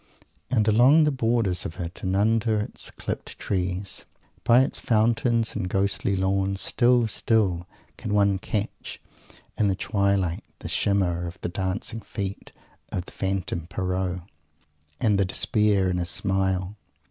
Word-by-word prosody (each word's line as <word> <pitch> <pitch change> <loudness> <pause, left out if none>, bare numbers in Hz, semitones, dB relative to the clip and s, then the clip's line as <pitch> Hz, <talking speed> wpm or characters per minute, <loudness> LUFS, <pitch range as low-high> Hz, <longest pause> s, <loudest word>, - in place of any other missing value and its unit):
And 115 -4 +2
along 125 +9 +6
the 150 - +3
borders 115 -8 +1
of 80 - -7
it 85 0 -6
and 95 0 -1
under 110 +1 +2
its 105 - -6
clipped - - -6
trees, 95 0 -2 0.4
by 120 +2 +6
its - - -1
fountains 115 0 +2
and 90 - -2
ghostly 100 +1 +1
lawns, 95 +1 0
still, 120 +1 +3
still 100 -6 +1 0.3
can - - -5
one 100 -2 +3
catch 105 +2 -4 0.6
in 105 - +4
the 95 - +1
twilight 100 -4 0
the - - -7
shimmer 90 -4 +1
of 85 +2 -9
the - - -2
dancing 95 +5 -3
feet 100 -3 -5 0.4
of 90 - -3
the - - -12
Phantom 95 -4 -2
Pierrot, 90 0 -2 0.8
and 105 -3 +2
the - - +4
despair 100 0 +2
in 90 - -1
his 90 0 -2
smile! 95 0 0
100 Hz, 145 wpm, -25 LUFS, 95-110 Hz, 0.8 s, along